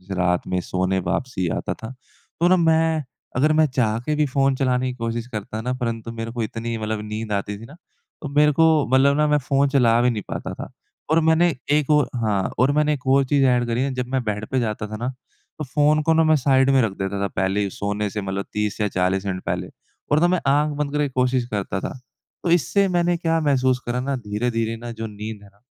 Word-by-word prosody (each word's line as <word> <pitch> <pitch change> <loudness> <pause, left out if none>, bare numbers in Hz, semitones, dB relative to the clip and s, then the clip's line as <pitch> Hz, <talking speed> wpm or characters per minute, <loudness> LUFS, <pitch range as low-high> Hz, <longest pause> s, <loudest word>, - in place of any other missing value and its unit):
रात 90 -1 0
में 90 - 0
सोने 95 +1 -1
वापसी 95 +2 -2
आता - - -3
था। 110 - -9 0.5
तो 170 - +4
ना 185 - +5
मैं 160 -2 +2 0.3
अगर 150 +4 +3
मैं 155 0 +4
चाह 115 -4 0
के 150 - 0
भी 150 - +2
फ़ोन 135 0 +1
चलाने 130 -1 +1
की - - -7
कोशिश 115 0 -3
करता 110 -1 -5
ना 125 +2 -2
परंतु 115 -1 -3
मेरे 115 0 -5
को 120 -2 -3
इतनी 115 +1 -4
मतलब 110 -1 -3
नींद 110 0 -5
आती 100 +1 -2
थी 115 - -10
ना 145 - -13 0.5
तो 150 - -5
मेरे 150 +1 +4
को 160 +3 +4 0.3
मतलब 140 +2 +4
ना 150 0 +3
मैं 150 0 +3
फ़ोन 140 +1 +1
चला 120 -4 +4
भी 125 - +3
नहीं 110 -3 -3
पाता - - -5
था। - - -8 0.4
और 160 - +4
मैंने 160 0 +3 0.2
एक 150 -1 +2
और 150 -2 +4
हाँ, 105 -5 0 0.2
और 130 +3 +4
मैंने 150 0 +2
एक 130 -3 -6
और 135 +1 +5
चीज़ 135 0 +2
ऐड 125 -1 +3
करी 120 +2 0
है। 135 -1 -2
जब 125 -1 -3
मैं 130 -2 +1
बेड 105 0 -3
पे 130 - +2
जाता 105 -2 -2
था 110 - -6
ना 120 +3 -3 0.5
तो - - -2
फ़ोन 150 +3 +2
को 160 - +3
ना 160 0 +4
मैं 155 0 +4
साइड 135 -1 +3
में 135 -1 +4
रख 115 - +1
देता 95 +1 -3
था 100 - +1
पहले 95 +2 -1
ही 100 - -1
सोने 100 +2 -2
से 105 +1 -4
मतलब 95 0 -3
30 105 0 -2
या 105 - +2
40 95 +1 0
मिनट 95 -2 -3
पहले 90 +1 -2 0.4
और 150 - +4
ना 175 - +5
मैं 180 -1 +2
आँख 150 +2 +3
बंद 150 -1 -2
करके 150 -1 +1
कोशिश 125 -1 +1
करता 100 -4 -3
था। - - -4 0.5
तो 170 - +1
इससे 175 +5 +3
मैंने 175 -1 +1
क्या 165 -1 +1
महसूस 130 -4 +2
करा 120 +1 -1
ना 135 +1 -1
धीरे-धीरे 115 0 -2
ना 120 +1 -7
जो 115 -1 -5
नींद 105 0 -7
है 100 - -15
ना 100 +1 -31
125 Hz, 240 wpm, -22 LUFS, 105-145 Hz, 0.5 s, ना